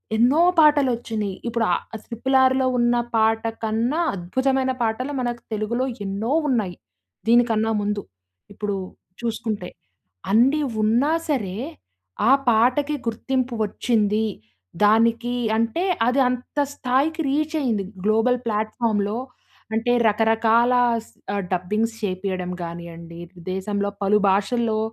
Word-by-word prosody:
ఎన్నో 250 +8 +4 0.2
పాటలొచ్చినియి. 240 -9 +2
ఇప్పుడు 235 -1 0
ఆహ్, - - 0 0.2
స్ - - -25
ట్రిపుల్ 260 +3 -1
ఆర్‌లో 260 0 +3
ఉన్న 240 0 +3 0.2
పాట 225 0 +3 0.2
కన్నా 230 +8 0 0.2
అద్భుతమైన 260 +8 0
పాటల 230 +5 -1
మనకు 240 -1 -3
తెలుగులో 230 +4 -1 0.2
ఎన్నో 205 +7 -2 0.2
ఉన్నాయి. 210 -8 0 0.5
దీనికన్నా 225 -2 +3
ముందు. 205 0 -1 0.5
ఇప్పుడు 205 0 -3 0.5
చూసుకుంటే. 220 -5 -3 0.6
అన్ని 265 +8 +4 0.2
ఉన్నా 240 +7 +3 0.2
సరే 205 -10 -1 0.7
ఆ - - +6 0.2
పాటకి 255 +6 +2
గుర్తింపు 255 +2 -1
వచ్చింది. 215 0 0 0.6
దానికి 230 +3 +3 0.2
అంటే 230 +10 0 0.2
అది 250 +3 +2
అంత 250 +3 -4 0.2
స్థాయికి 285 +6 0
రీచ్ 305 +3 0
అయింది. 220 -7 0 0.2
గ్లోబల్ 225 +4 +3
ప్లాట్ఫామ్‌లో 215 -1 -1 0.6
అంటే 235 +2 +1
రకరకాల 225 +3 +3 0.3
స్ - - -21 0.2
ఆహ్, 200 - -1
డబ్బింగ్స్ 210 +6 0
చేపియడం 185 -2 -3
గానియండి, 170 0 -8
ఇపుడు 175 0 -16
దేశంలో 200 +1 -2
పలు 200 +2 +4
భాషల్లో 215 +3 +1
225 Hz, 115 wpm, -23 LUFS, 205-250 Hz, 0.7 s, ఆ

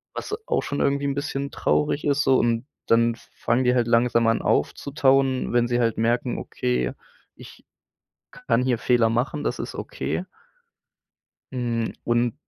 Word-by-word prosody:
was - - -4
auch - - 0
schon 145 - -3
irgendwie 140 0 +1
'n 140 - 0
bisschen 140 -1 -3
traurig 150 0 0
ist 145 -1 +2
so, 135 -1 +4
und, 115 +1 +1 0.2
dann 115 0 +3
f - - -19
fangen 120 +2 +1
die 125 - +3
halt 120 -1 +2
langsam 115 0 +3
an 115 0 +2
aufzutauen, 135 -2 +1
wenn 120 0 +2
sie 120 0 +1
halt 115 -2 +1
merken: 120 +2 0
„Okay, 60 0 -2 0.4
ich - - -14 0.7
kann 115 +2 0
hier 125 -3 +1
Fehler 120 -2 +3
machen, 125 +6 -1
das - - -2
ist - - -5
okay“. - - -4 1.3
Hm, 120 -2 -2
und 120 +1 +1
120 Hz, 160 wpm, -24 LUFS, 115-135 Hz, 1.3 s, so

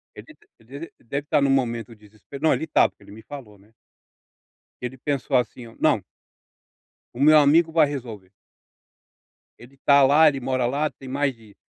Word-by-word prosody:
Ele - - -11
de - - -17 0.2
às 115 - -24
vezes, 140 +6 -9
ele - - -28
deve 140 +1 -3
estar 145 0 +1
em - - +3
um - - -1
momento 120 -4 -1
de 105 -1 -20
desespe 110 +6 -13
não 160 +1 +2
ele - - -3
estava, 160 - +2
porque - - -25
ele - - -16
me 110 +2 -12
falou, 120 -8 -11
né. 100 +3 -25 1.1
Ele 125 +1 -6
pensou, 140 0 -2
assim, 125 0 -2
ó: 115 - -16
"Não" - - +2 1.1
o 125 - -10
meu 155 +1 +6
amigo 160 +3 +3
vai 160 -2 +4
resolver 115 -9 -8 1.3
ele 120 +3 -16
está 140 +1 +3
lá, 150 +4 +5
ele 140 -2 -2
mora 130 -1 -1
lá 145 +4 -1
tem 135 - -14
mais 135 0 -1
de 110 -3 -20
135 Hz, 200 wpm, -23 LUFS, 115-145 Hz, 1.3 s, meu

